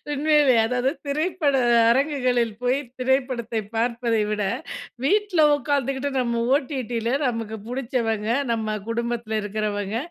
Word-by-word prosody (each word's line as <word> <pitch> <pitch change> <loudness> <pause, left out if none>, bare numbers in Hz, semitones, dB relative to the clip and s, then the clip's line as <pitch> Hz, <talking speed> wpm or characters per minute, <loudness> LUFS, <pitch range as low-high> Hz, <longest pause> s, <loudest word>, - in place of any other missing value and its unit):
உண்மைலேயே! 295 -3 +4
அதாவது 250 +2 0 0.2
திரைப்பட 305 +1 0 0.4
அரங்குகளில் 255 -3 +1
போய் 250 +2 +2 0.2
திரைப்படத்தைப் 250 -5 -1
பார்ப்பதைவிட, 225 -3 0 0.6
வீட்ல 395 0 +3
உட்கார்ந்துக்கிட்டு 280 -1 -1
நம்ம 235 -2 0
ஓடிடி 260 -5 -2
ல - - +2 0.2
நமக்கு 225 -2 -3
புடிச்சவங்க, 235 -4 -2 0.2
நம்ம 220 -2 -1
குடும்பத்தில 235 -1 -2
இருக்கிறவங்க, 205 0 -2
245 Hz, 100 wpm, -23 LUFS, 225-275 Hz, 0.6 s, உண்மைலேயே